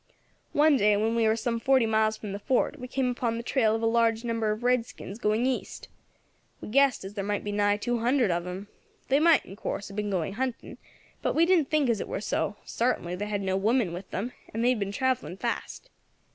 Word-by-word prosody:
One 295 Hz, -1 st, +5 dB
day, 210 Hz, -3 st, +4 dB
when 220 Hz, +2 st, +1 dB
we 230 Hz, -1 st, +2 dB
war 220 Hz, 0 st, +3 dB
some 230 Hz, +1 st, -2 dB
forty 260 Hz, 0 st, +3 dB
miles 220 Hz, 0 st, +2 dB
from 210 Hz, -2 st, -7 dB
the 200 Hz, -, -5 dB
fort, 265 Hz, +6 st, 0 dB
we 250 Hz, -, -6 dB
came 255 Hz, 0 st, 0 dB
upon 235 Hz, -2 st, -2 dB
the 235 Hz, -, -5 dB
trail 225 Hz, -4 st, +2 dB
of 225 Hz, -, -3 dB
a -, -, +3 dB
large 225 Hz, 0 st, +2 dB
number 230 Hz, -2 st, -1 dB
of 215 Hz, +3 st, -2 dB
redskins 240 Hz, -4 st, -1 dB
going 215 Hz, +1 st, +1 dB
east. 260 Hz, -1 st, -3 dB, 0.7 s
We -, -, -8 dB
guessed 270 Hz, -3 st, +3 dB
as 195 Hz, -, -7 dB
there 200 Hz, -1 st, -3 dB
must 205 Hz, +1 st, -2 dB
be 205 Hz, -, -3 dB
nigh 205 Hz, 0 st, +2 dB
two 240 Hz, +3 st, -1 dB
hundred 240 Hz, -2 st, +2 dB
of 170 Hz, 0 st, -1 dB
them. 180 Hz, +3 st, -6 dB, 0.4 s
They 275 Hz, +2 st, +4 dB
might, 325 Hz, 0 st, +4 dB
in 195 Hz, -, -10 dB
course, 200 Hz, -, -4 dB
have 200 Hz, -, -10 dB
been 210 Hz, 0 st, -2 dB
going 190 Hz, -1 st, -1 dB
hunting, 255 Hz, +2 st, -4 dB, 0.4 s
but -, -, -1 dB
we 330 Hz, -, +5 dB
didn't 340 Hz, -5 st, +3 dB
think 305 Hz, -3 st, +2 dB
as 230 Hz, -4 st, +1 dB
it -, -, -5 dB
were -, -, -3 dB
so; 205 Hz, 0 st, -1 dB
sartainly 225 Hz, -7 st, -1 dB
they 205 Hz, +3 st, -4 dB
had 205 Hz, -1 st, -2 dB
no 190 Hz, 0 st, 0 dB
women 210 Hz, -1 st, +1 dB
with 185 Hz, +2 st, -7 dB
them, 230 Hz, +6 st, -3 dB, 0.2 s
and 225 Hz, +2 st, -1 dB
they -, -, +5 dB
had 250 Hz, -3 st, +1 dB
been 200 Hz, -1 st, -2 dB
travelling 255 Hz, -5 st, -1 dB
fast. -, -, -4 dB
225 Hz, 235 wpm, -27 LUFS, 205-250 Hz, 0.7 s, One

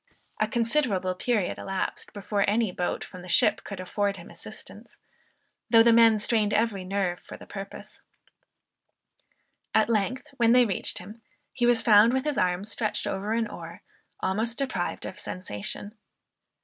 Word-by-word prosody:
A -, -, +2 dB
considerable 230 Hz, -7 st, +1 dB
period 210 Hz, 0 st, -1 dB
elapsed, 195 Hz, -1 st, -3 dB
before 205 Hz, 0 st, -1 dB
any 220 Hz, -1 st, +1 dB
boat 180 Hz, 0 st, -2 dB
from 185 Hz, -2 st, -10 dB
the 180 Hz, -, -11 dB
ship 175 Hz, -, +3 dB
could 200 Hz, -2 st, -7 dB
afford 200 Hz, +2 st, -1 dB
him 170 Hz, -, -11 dB
assistance, -, -, -12 dB, 0.7 s
though 225 Hz, -1 st, +7 dB
the 230 Hz, 0 st, +5 dB
men 225 Hz, -1 st, +6 dB
strained 210 Hz, -1 st, +1 dB
every 215 Hz, -4 st, 0 dB
nerve 185 Hz, -2 st, -1 dB
for -, -, -11 dB
the -, -, -12 dB
purpose. 195 Hz, 0 st, -9 dB, 1.8 s
At 220 Hz, +1 st, +4 dB
length, 230 Hz, +5 st, 0 dB
when 235 Hz, -1 st, +4 dB
they 250 Hz, 0 st, +6 dB
reached 195 Hz, -5 st, -1 dB
him, 210 Hz, +5 st, -9 dB, 0.3 s
he 240 Hz, -1 st, +1 dB
was 240 Hz, -1 st, +4 dB
found 215 Hz, +2 st, +6 dB
with 265 Hz, 0 st, +1 dB
his 295 Hz, -3 st, 0 dB
arms 185 Hz, +3 st, 0 dB
stretched 215 Hz, -3 st, -2 dB
over 200 Hz, +3 st, -2 dB
an 230 Hz, 0 st, +1 dB
oar, 170 Hz, -3 st, -10 dB, 0.4 s
almost 220 Hz, +5 st, -1 dB
deprived 255 Hz, -11 st, -2 dB
of 190 Hz, -, -7 dB
sensation. 185 Hz, -, -4 dB
210 Hz, 155 wpm, -27 LUFS, 190-230 Hz, 1.8 s, though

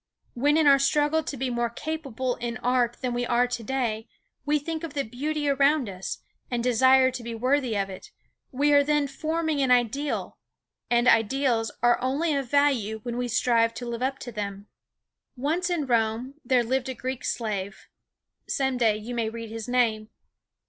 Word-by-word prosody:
When 290 Hz, +5 st, +2 dB
in 320 Hz, -, +3 dB
our 280 Hz, -1 st, +7 dB
struggle 295 Hz, +3 st, +2 dB
to 285 Hz, -, -6 dB
be 255 Hz, 0 st, -2 dB
more 240 Hz, 0 st, 0 dB
capable 260 Hz, -2 st, -3 dB
in 240 Hz, 0 st, -4 dB
art 245 Hz, -1 st, +1 dB
than 250 Hz, -2 st, -1 dB
we 245 Hz, 0 st, -1 dB
are 240 Hz, 0 st, +2 dB
to 245 Hz, -1 st, -4 dB
day 225 Hz, -2 st, -2 dB, 0.4 s
we 300 Hz, +1 st, +3 dB
think 320 Hz, +2 st, -5 dB
of 320 Hz, -3 st, -6 dB
the 280 Hz, -, 0 dB
beauty 290 Hz, +6 st, -3 dB
around 280 Hz, -1 st, +3 dB
us, 190 Hz, -1 st, -6 dB, 0.3 s
and 240 Hz, -2 st, -1 dB
desire 260 Hz, +2 st, +5 dB
to 250 Hz, -, -6 dB
be 235 Hz, 0 st, -6 dB
worthy 255 Hz, -1 st, +1 dB
of 195 Hz, -1 st, 0 dB
it, 190 Hz, -1 st, -10 dB, 0.4 s
we 290 Hz, +3 st, +2 dB
are 285 Hz, 0 st, +6 dB
then 295 Hz, 0 st, +1 dB
forming 315 Hz, +1 st, -1 dB
an 265 Hz, -, +2 dB
ideal, 250 Hz, +4 st, 0 dB, 0.5 s
and 240 Hz, 0 st, +3 dB
ideals 230 Hz, 0 st, +2 dB
are 240 Hz, 0 st, +4 dB
only 285 Hz, +6 st, 0 dB
of 275 Hz, -3 st, -2 dB
value 260 Hz, -7 st, +2 dB
when 240 Hz, -1 st, -4 dB
we 245 Hz, 0 st, -2 dB
strive 230 Hz, -1 st, +2 dB
to 245 Hz, +2 st, -6 dB
live 235 Hz, 0 st, -4 dB
up 265 Hz, +1 st, -1 dB
to 245 Hz, -, -8 dB
them. 200 Hz, -2 st, -5 dB, 0.7 s
Once 325 Hz, +8 st, -1 dB
in 340 Hz, -5 st, 0 dB
Rome 235 Hz, +1 st, 0 dB
there 250 Hz, -1 st, +3 dB
lived 260 Hz, +2 st, -1 dB
a 260 Hz, -, -4 dB
Greek 255 Hz, 0 st, -5 dB
slave 200 Hz, -4 st, -3 dB, 0.6 s
some 265 Hz, -2 st, 0 dB
day 225 Hz, -3 st, +3 dB
you 220 Hz, +3 st, -7 dB
may 230 Hz, -2 st, -1 dB
read 230 Hz, -1 st, -7 dB
his 225 Hz, 0 st, -6 dB
name. 225 Hz, -3 st, +1 dB
250 Hz, 185 wpm, -26 LUFS, 230-280 Hz, 0.7 s, our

